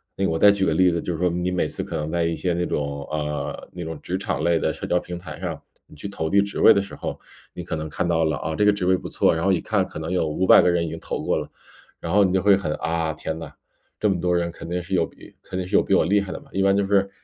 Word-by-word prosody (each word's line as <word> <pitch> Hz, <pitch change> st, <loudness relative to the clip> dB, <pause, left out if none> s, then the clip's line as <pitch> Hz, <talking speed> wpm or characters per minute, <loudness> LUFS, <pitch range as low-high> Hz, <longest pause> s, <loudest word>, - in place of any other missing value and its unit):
那 100 Hz, -, -2 dB
个 -, -, +2 dB
我 80 Hz, -, 0 dB
再 105 Hz, -, +7 dB
举 100 Hz, -1 st, 0 dB
个 80 Hz, -, +1 dB
例 90 Hz, +1 st, +4 dB
子， 85 Hz, 0 st, -1 dB
就 90 Hz, -, -3 dB
是 -, -, -4 dB
说， 90 Hz, -, +2 dB
你 90 Hz, +1 st, -1 dB
每 90 Hz, -1 st, 0 dB
次 -, -, -3 dB
可 -, -, -6 dB
能 75 Hz, +1 st, -3 dB
在 85 Hz, -1 st, +1 dB
一 85 Hz, 0 st, 0 dB
些 90 Hz, -2 st, -1 dB
那 90 Hz, +1 st, -1 dB
种， 70 Hz, -1 st, -3 dB
呃 75 Hz, -1 st, -3 dB
那 90 Hz, -, -6 dB
种 80 Hz, -2 st, -6 dB
职 90 Hz, -, -3 dB
场 75 Hz, -6 st, -2 dB
类 85 Hz, -1 st, +3 dB
的 -, -, 0 dB
社 -, -, -6 dB
交 90 Hz, -, +2 dB
平 90 Hz, 0 st, -7 dB
台 85 Hz, -1 st, -9 dB
上， -, -, -4 dB, 0.3 s
你 -, -, -16 dB
去 75 Hz, -, -6 dB
投 80 Hz, -5 st, -3 dB
递 100 Hz, -, +4 dB
职 100 Hz, 0 st, -1 dB
位 -, -, +8 dB
的 -, -, +2 dB
时 100 Hz, -, -11 dB
候。 -, -, -5 dB, 0.4 s
你 90 Hz, -, -5 dB
可 85 Hz, -, -4 dB
能 80 Hz, 0 st, -4 dB
看 80 Hz, -, -2 dB
到 80 Hz, -1 st, +2 dB
了， 80 Hz, -3 st, 0 dB
啊， 80 Hz, -, -3 dB
这 105 Hz, -, +1 dB
个 105 Hz, -, +6 dB
职 100 Hz, -3 st, -2 dB
位 95 Hz, -, +4 dB
不 -, -, -6 dB
错， -, -, +3 dB
然 80 Hz, -, -2 dB
后 95 Hz, -, +3 dB
一 90 Hz, -, +2 dB
看 -, -, 0 dB
可 -, -, -9 dB
能 80 Hz, +3 st, -4 dB
有 90 Hz, -3 st, +1 dB
500 90 Hz, +5 st, +5 dB
个 -, -, +3 dB
人 85 Hz, -1 st, +1 dB
已 -, -, -4 dB
经 80 Hz, +1 st, -6 dB
投 -, -, -4 dB
过 -, -, +1 dB
了。 -, -, -4 dB, 0.5 s
然 85 Hz, -, -4 dB
后 100 Hz, 0 st, +6 dB
你 95 Hz, -, +2 dB
就 95 Hz, 0 st, +2 dB
会 100 Hz, -1 st, +6 dB
很 95 Hz, -5 st, -2 dB
啊， 80 Hz, -1 st, -1 dB
天 80 Hz, +1 st, -5 dB
呐， 80 Hz, -3 st, -8 dB, 0.5 s
这 105 Hz, -, +2 dB
么 95 Hz, -3 st, +1 dB
多 90 Hz, 0 st, +1 dB
人 85 Hz, 0 st, 0 dB
肯 85 Hz, -, -9 dB
定 90 Hz, +1 st, -1 dB
是 95 Hz, +2 st, -7 dB
有 90 Hz, -3 st, +3 dB
比 -, -, -17 dB
肯 95 Hz, -, -7 dB
定 90 Hz, -1 st, -3 dB
是 100 Hz, -, -1 dB
有 -, -, +6 dB
比 100 Hz, -, +1 dB
我 -, -, +3 dB
厉 100 Hz, +1 st, +3 dB
害 95 Hz, -, -6 dB
的 -, -, -5 dB
嘛。 -, -, -19 dB
一 95 Hz, -, -1 dB
般 100 Hz, 0 st, +4 dB
就 100 Hz, 0 st, +2 dB
是， 100 Hz, 0 st, +2 dB
90 Hz, 350 characters per minute, -23 LUFS, 80-95 Hz, 0.5 s, 位